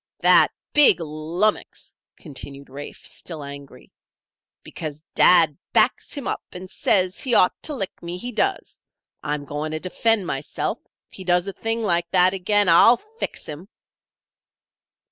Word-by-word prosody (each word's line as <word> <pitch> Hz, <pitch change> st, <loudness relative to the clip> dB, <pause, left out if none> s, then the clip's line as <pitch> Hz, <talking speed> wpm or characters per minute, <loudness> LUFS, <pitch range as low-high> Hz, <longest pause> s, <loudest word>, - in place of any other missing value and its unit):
"That -, -, +5 dB, 0.2 s
big 295 Hz, -9 st, +6 dB
lummox!" 165 Hz, +6 st, -3 dB, 0.2 s
continued 140 Hz, -2 st, -10 dB
Rafe, 145 Hz, +2 st, -10 dB
still 160 Hz, -4 st, -8 dB
angry. 140 Hz, 0 st, -11 dB, 0.7 s
"Because 155 Hz, 0 st, -8 dB
dad 165 Hz, -5 st, +5 dB
backs -, -, +2 dB
him 280 Hz, -, -5 dB
up -, -, -2 dB
and 185 Hz, +1 st, -8 dB
says 185 Hz, 0 st, +1 dB
he 250 Hz, -3 st, +1 dB
ought 180 Hz, -, +5 dB
to 300 Hz, -, -4 dB
lick 195 Hz, -7 st, -5 dB
me, 175 Hz, +1 st, -5 dB
he 245 Hz, +7 st, -5 dB
does 390 Hz, -, +1 dB
this. -, -, -15 dB, 0.4 s
I'm 150 Hz, -1 st, -3 dB
going 150 Hz, +2 st, -4 dB
to 155 Hz, -, -3 dB
defend 205 Hz, +3 st, 0 dB
myself. 140 Hz, -3 st, -3 dB, 0.3 s
If -, -, -12 dB
he 190 Hz, -, -8 dB
does 175 Hz, 0 st, +2 dB
a 195 Hz, -, -4 dB
thing 225 Hz, +2 st, -2 dB
like 175 Hz, -4 st, 0 dB
that 180 Hz, +1 st, +4 dB
again, 205 Hz, +2 st, +1 dB
I'll 200 Hz, +8 st, +7 dB
fix 440 Hz, -, -7 dB
him." 155 Hz, +5 st, -9 dB
180 Hz, 150 wpm, -22 LUFS, 155-205 Hz, 0.7 s, I'll